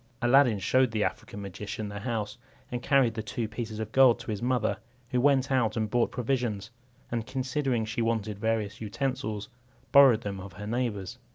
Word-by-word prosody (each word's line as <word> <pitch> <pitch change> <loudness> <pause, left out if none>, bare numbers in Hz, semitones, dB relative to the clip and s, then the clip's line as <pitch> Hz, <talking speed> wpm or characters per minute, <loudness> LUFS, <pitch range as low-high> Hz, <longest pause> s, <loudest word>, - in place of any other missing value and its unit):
Aladdin 120 -2 +5
showed 130 +7 +3
the 110 -2 0
African 100 - -4
magician 105 +2 -5
the 100 0 -6
house, 110 0 -3 0.3
and 120 0 -3
carried 135 -4 +3
the 110 - -3
two 110 +1 -3
pieces 110 0 -5
of 110 -1 -4
gold 130 -2 +6
to - - -5
his 105 - -4
mother, 120 -3 +1 0.3
who 125 - +2
went 135 -1 +3
out 120 -4 +2
and 110 -2 -1
bought 120 -1 +2
provisions; 120 -5 -2 0.4
and 115 -2 -2
considering 130 -2 -1
she 110 +2 -3
wanted 110 -3 -1
various 110 -1 -1
utensils, 110 -2 -3 0.4
borrowed 135 -6 +7
them 100 -3 -4
of 95 -1 -9
her 105 +4 -8
neighbours. 110 -4 -3
115 Hz, 180 wpm, -28 LUFS, 105-125 Hz, 0.4 s, borrowed